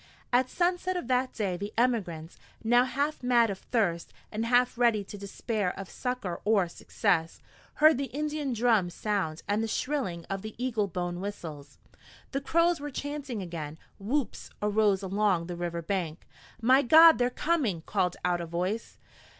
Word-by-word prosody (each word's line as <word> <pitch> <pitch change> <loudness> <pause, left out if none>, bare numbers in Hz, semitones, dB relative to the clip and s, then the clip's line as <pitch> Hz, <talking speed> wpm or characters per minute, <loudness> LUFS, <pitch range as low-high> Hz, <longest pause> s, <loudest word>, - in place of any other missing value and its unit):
At 255 +1 +3
sunset 360 +1 0
of 310 - -5
that 255 0 +2
day 195 -5 -2
the 205 +3 -5
emigrants, 190 -10 -1 0.2
now 240 +2 +4
half 285 +4 -2
mad 240 -3 +3
of 190 - -6
thirst, 195 -9 -1 0.2
and 225 +2 -2
half 245 +1 +3
ready 235 -4 +3
to 200 - -10
despair 200 0 -3
of 195 -1 -7
succor 250 -9 -3
or 205 -4 +3
success, 170 -1 -1 0.4
heard 310 -2 +5
the 280 - 0
Indian 300 0 -3
drums 220 -7 +2
sound 195 -7 -2
and 205 +2 +1
the 225 - -1
shrilling 220 - -2
of 195 0 -4
the 215 +1 -8
eagle 235 -4 0
bone 175 -1 -3
whistles. 155 -8 -7 0.5
The 275 - -2
Crows 335 +3 +2
were 290 +1 -5
chanting 280 -6 -4
again. 160 -3 -6 0.2
Whoops 250 +7 -2
arose 210 -2 +2
along 195 -3 +1
the 175 0 -5
river 170 -1 -3
bank. 170 -3 -3 0.3
"My 255 +4 +5
God! 320 +4 +8
they're 245 0 +3
coming!" 250 - 0
called 185 -3 0
out 175 -1 +1
a 170 - -5
voice. 180 +7 -3
215 Hz, 165 wpm, -29 LUFS, 180-255 Hz, 0.5 s, God